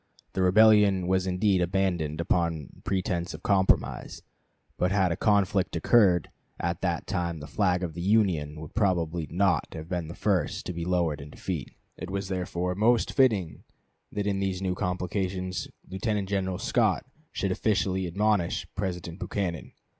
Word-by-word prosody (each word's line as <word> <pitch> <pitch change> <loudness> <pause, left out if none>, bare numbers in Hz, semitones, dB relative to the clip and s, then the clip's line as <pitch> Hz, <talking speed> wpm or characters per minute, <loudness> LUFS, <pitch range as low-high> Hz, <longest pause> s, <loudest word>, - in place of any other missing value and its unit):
The 95 - -1
rebellion 100 -1 +5
was 95 +1 +1
indeed 95 +1 +2
abandoned 85 -4 0
upon 85 -4 -1
pretense 90 -3 -1
of 80 - -12
compromise; 95 -2 +1 0.5
but 90 +1 0
had 95 -3 +2
a - - 0
conflict 100 -3 +2
occurred 90 -1 +4 0.3
at 85 +1 -2
that 85 -3 -1
time 85 -4 -2
the 75 - -8
flag 90 +1 +1
of 85 -3 -3
the 85 - -6
Union 90 -7 +1
would 75 -1 -9
probably 85 -6 0
not 90 -2 +2
have 80 0 -7
been 90 -3 -2
the 85 - -8
first 95 -7 0
to 90 - -4
be 85 0 -4
lowered 85 -5 0
in 70 - -10
defeat. - - -5 0.2
It - - -6
was, 100 0 -3
therefore, 90 -1 -2
most 115 +5 +2
fitting 105 - +2 0.5
that 105 -1 -2
in 100 -1 0
these 95 -2 -1
new 95 -1 -1
complications 90 0 -2 0.2
Lieutenant 100 +1 -2
General 95 -2 -1
Scott 110 0 +1 0.3
should 95 - -1
officially 95 -2 0
admonish 95 -1 +1
President 90 -3 -4
Buchanan. 90 -5 -3
90 Hz, 155 wpm, -27 LUFS, 85-100 Hz, 0.5 s, rebellion